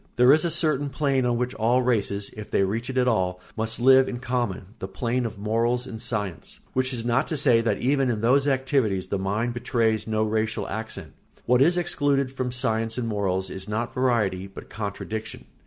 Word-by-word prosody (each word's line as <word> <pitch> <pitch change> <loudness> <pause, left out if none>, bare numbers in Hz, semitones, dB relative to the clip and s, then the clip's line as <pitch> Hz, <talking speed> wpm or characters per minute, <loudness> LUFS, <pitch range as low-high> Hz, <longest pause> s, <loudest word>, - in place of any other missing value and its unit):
There 125 +3 +6
is 155 - +3
a 170 - +1
certain 155 -4 0
plane 135 -2 +1
on 120 -1 +1
which 125 +1 -2
all 120 +3 +2
races, 105 -4 0
if 105 -1 -8
they - - +2
reach 110 +6 -2
it 130 - -3
at 125 0 +3
all, 90 -6 +1 0.2
must 110 +1 -1
live 130 +1 +6
in 120 - -4
common, 120 -6 -3
the 95 - -4
plane 120 +5 -1
of 110 -1 -9
morals 115 +4 0
and 115 -4 -7
science; 105 -6 -3
which 130 0 0
is 120 -3 -3
not 120 +4 +1
to 155 - -2
say 125 -5 +4
that 110 -3 0
even 135 +1 +1
in 110 -3 -1
those 135 +5 +3
activities 130 -8 +1
the 100 - -1
mind 105 +5 -1
betrays 115 -3 0
no 110 0 +1
racial 110 0 -1
accent. 110 -7 -6 0.3
What 125 +1 +3
is 175 +5 +4
excluded 140 -6 0
from 130 -2 -3
science 115 -2 -1
and 120 -2 -2
morals 95 -3 -1
is 95 +2 -7
not 115 +3 -2
variety, 110 -7 0
but 95 - -12
contradiction. 110 +1 -5
115 Hz, 205 wpm, -25 LUFS, 105-130 Hz, 0.3 s, There